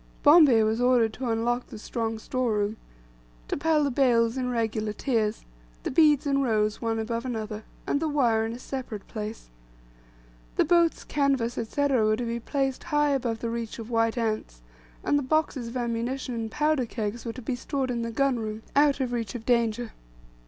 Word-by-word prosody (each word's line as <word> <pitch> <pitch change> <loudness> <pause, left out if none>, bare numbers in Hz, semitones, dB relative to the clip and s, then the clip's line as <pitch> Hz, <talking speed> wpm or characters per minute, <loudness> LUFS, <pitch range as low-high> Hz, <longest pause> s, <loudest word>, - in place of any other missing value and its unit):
Bombay 290 -7 +7
was 220 +2 +1
ordered 245 -3 +3
to 250 0 -4
unlock 240 +2 0
the - - -9
strong 225 +1 -3
store 245 +1 -1
room, 210 +1 -1 0.7
to - - -1
pile 305 +1 +2
the 280 - +1
bales 240 -3 +3
in 255 -1 -1
regular 220 -3 -1
tiers, 220 -3 -1 0.4
the - - -2
beads 300 -1 +4
in 275 -1 +2
rows 215 -4 +1
one 225 -1 -1
above 230 +1 -2
another, 220 -4 -4 0.2
and 285 - +1
the 320 - -1
wire 240 -7 +2
in 225 +1 -3
a - - -6
separate 250 -5 -6
place. 215 - -6 1.0
The - - +3
boats, 340 0 +3
canvas, 270 -5 +1
&c., 230 +6 -3
were 220 -6 +3
to 245 - -3
be 235 0 -2
placed 270 +1 -2
high 295 -1 +2
above 240 -5 -1
reach 230 -1 -3
of 230 0 -8
white 225 0 +1
ants, 215 - -2 0.4
and 290 - +2
the - - -2
boxes 280 -3 0
of 235 +2 -5
ammunition 240 +2 -2
and 225 -1 -3
powder 300 -2 +1
kegs 225 0 -4
were 230 - -4
to 255 - -8
be 250 +3 -2
stored 265 +1 -2
in 235 -1 -2
the 230 - -2
gun 260 +1 +1
room, 215 0 -5
out 285 -1 +4
of 250 -2 -1
reach 230 -4 -3
of 225 -2 -6
danger. 235 -1 +1
235 Hz, 190 wpm, -27 LUFS, 225-270 Hz, 1.0 s, Bombay